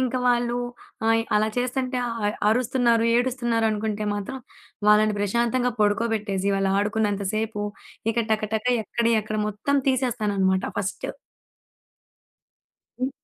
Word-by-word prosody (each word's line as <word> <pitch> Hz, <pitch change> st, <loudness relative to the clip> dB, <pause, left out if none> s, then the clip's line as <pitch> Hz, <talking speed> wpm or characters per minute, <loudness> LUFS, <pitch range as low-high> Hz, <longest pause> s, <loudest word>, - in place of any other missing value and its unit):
ఇంక 255 Hz, -1 st, 0 dB
వాళ్లు 240 Hz, 0 st, +2 dB, 0.5 s
ఆహ్, 225 Hz, 0 st, +4 dB
అలా 215 Hz, +1 st, +2 dB
చేస్తంటే, 255 Hz, +1 st, -1 dB, 0.5 s
అరుస్తున్నారు, 235 Hz, 0 st, +2 dB
ఏడుస్తున్నారు 240 Hz, -2 st, +1 dB
అనుకుంటే 215 Hz, 0 st, -2 dB
మాత్రం 205 Hz, +6 st, -4 dB, 0.5 s
వాళ్లని 210 Hz, 0 st, +5 dB
ప్రశాంతంగా 235 Hz, +4 st, +1 dB
పడుకోబెట్టేసి, 205 Hz, -2 st, +1 dB
వాళ్లు 195 Hz, 0 st, +1 dB
ఆడుకున్నంతసేపు 210 Hz, 0 st, -1 dB, 0.5 s
ఇక 230 Hz, 0 st, 0 dB
టక 215 Hz, +1 st, 0 dB
టక 220 Hz, +2 st, -1 dB, 0.2 s
ఎక్కడయి 230 Hz, +2 st, +1 dB
అక్కడ 215 Hz, 0 st, -3 dB
మొత్తం 225 Hz, +7 st, 0 dB
తీసేస్తాననమాట 210 Hz, -7 st, +1 dB
ఫస్ట్. 195 Hz, -1 st, -3 dB, 1.9 s
హ్మ్. 255 Hz, +1 st, 0 dB
225 Hz, 105 wpm, -24 LUFS, 210-245 Hz, 1.9 s, వాళ్లని